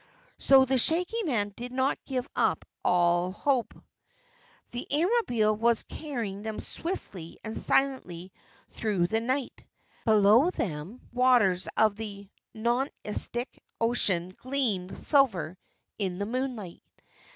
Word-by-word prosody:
So, 265 -1 +6
the 265 0 +2
Shaggy 360 - +4
Man 220 -9 0
didn't 255 +3 -2
give 255 -1 -3
up - - 0 0.2
all 175 0 +2
hope. 255 +4 -1 1.0
The 245 +1 -6
Airmobile 290 - +1
was 230 +1 +2
carrying 235 -10 -6
them 220 0 -5
swiftly 195 - -6
and 220 0 -6
silently 190 -10 +2 0.4
through 205 -6 -1
the 220 +5 0
night. 255 +3 -3 0.4
Below 220 - +5
them 180 - -5
the - - -24
waters 220 -9 +3
of 215 -2 +3
the 200 -2 -8 0.3
Nonestic 240 0 -1 0.2
Ocean 190 -6 +2
gleamed 245 -9 -2
silver 220 - +2 0.4
in 185 -3 -2
the 200 - -2
moonlight. 240 -6 -4
230 Hz, 115 wpm, -28 LUFS, 195-260 Hz, 1.0 s, So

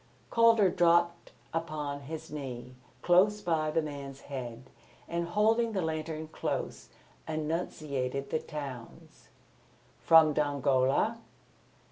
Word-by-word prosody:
Calder 230 -5 +5
dropped 170 0 +2 0.2
upon 150 -3 -3
his 155 +3 -8
knee 125 -4 -6 0.3
close 195 +4 +4
by 165 -5 0
the 160 +1 +1
man's 140 -2 -7
head 125 -3 -7 0.4
and, 170 0 -2
holding 220 +5 +2
the 190 - 0
lantern 160 0 -3
close, 160 - -4 0.4
enunciated 150 -4 -3
the 160 - +1
towns. 140 -7 -9 0.7
"From 160 -2 +6
Dongola?" 140 - +1
155 Hz, 100 wpm, -30 LUFS, 140-170 Hz, 0.7 s, From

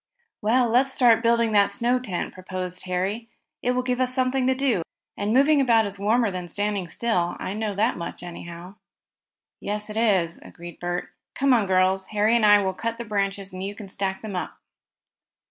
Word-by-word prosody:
"Well, 240 +4 +3
let's 255 +4 +3
start 235 -4 +4
building 235 -1 +2
that 200 -1 +4
snow 245 +1 +1
tent," 200 -9 -4
proposed 185 0 -6
Harry. 195 +5 -2 0.3
"It 250 - +1
will 250 0 0
give 250 0 -1
us 255 0 +1
something 255 0 +1
to 260 - +3
do, 260 -8 +1 0.3
and 205 +1 -2
moving 280 +4 +5
about 230 -4 +4
is 200 -1 -6
warmer 220 +2 +2
than 180 -1 -5
standing 205 +1 -2
still. 175 -3 -1
I 190 - -4
know 210 -1 -3
that 220 +5 +1
much, 170 +1 -6
anyhow." 175 +2 -9 0.8
"Yes, 210 +1 -4
it 215 - -6
is," 190 -7 +2
agreed 175 0 -11
Bert. 175 0 -3 0.3
"Come 275 -1 +3
on, 220 -5 +2
girls. 190 0 +2
Harry 215 +2 +2
and 225 -3 +4
I 205 -1 +6
will 190 0 -1
cut 230 +4 -3
the 235 - -6
branches 195 -2 -2
and 185 - -6
you 200 +2 -4
can 205 -1 -9
stack 190 0 -3
them 210 -3 -5
up." 180 - -4
210 Hz, 195 wpm, -24 LUFS, 185-235 Hz, 0.8 s, I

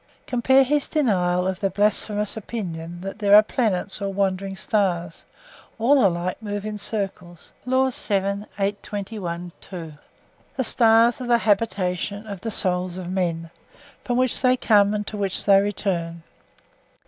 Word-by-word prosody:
(Compare 265 +2 +4
his 290 +2 0
denial 180 - +1
of 190 0 -2
the 195 -2 0
'blasphemous 210 +1 0
opinion' 175 -6 -6
that 195 +2 -7
there 205 -1 +5
are 210 - +9
planets 205 -5 -1
or 200 0 -2
wandering 195 0 -1
stars; 180 -5 -1 0.5
all 255 +3 +4
alike 180 +1 0
move 205 -1 -4
in 215 0 -4
circles—Laws.) 210 +6 -3
The 200 0 -1 2.2
stars 230 +1 +4
are 250 - -4
the 240 -1 +4
habitations 200 -2 -1
of 200 -4 -7
the 225 - -3
souls 180 -3 -1
of 180 -1 -6
men, 165 -3 -2 0.5
from 245 -1 -1
which 255 -1 +1
they 255 0 +4
come 205 -3 +3
and 210 0 -3
to 210 - -6
which 195 -2 -2
they 195 -1 +6
return. 175 -5 -2
200 Hz, 135 wpm, -23 LUFS, 185-225 Hz, 2.2 s, are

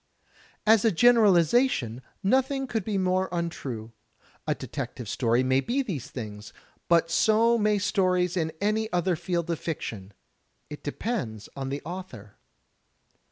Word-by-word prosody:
As 220 -1 +5
a 225 - +5
generalization, 195 - +4 0.2
nothing 265 +5 +2
could 225 -5 -2
be 210 -1 -2
more 185 0 +1
untrue. 140 -10 -4 0.6
A - - +1
detective 120 - -6
story 120 +3 +1
may 130 +1 +3
be 260 - 0
these 145 - -5
things, 105 -4 -8 0.3
but 165 -1 +3
so 225 +6 +4
may 210 0 +2
stories 185 -3 +1
in 160 -3 0
any 215 +2 0
other 180 0 +1
field 170 0 -2
of 165 - -2
fiction. 110 - -5 0.6
It 150 - -7
depends 145 - -4
on 135 -1 -4
the 140 +1 -4
author. 160 - -8
180 Hz, 135 wpm, -27 LUFS, 135-215 Hz, 0.6 s, As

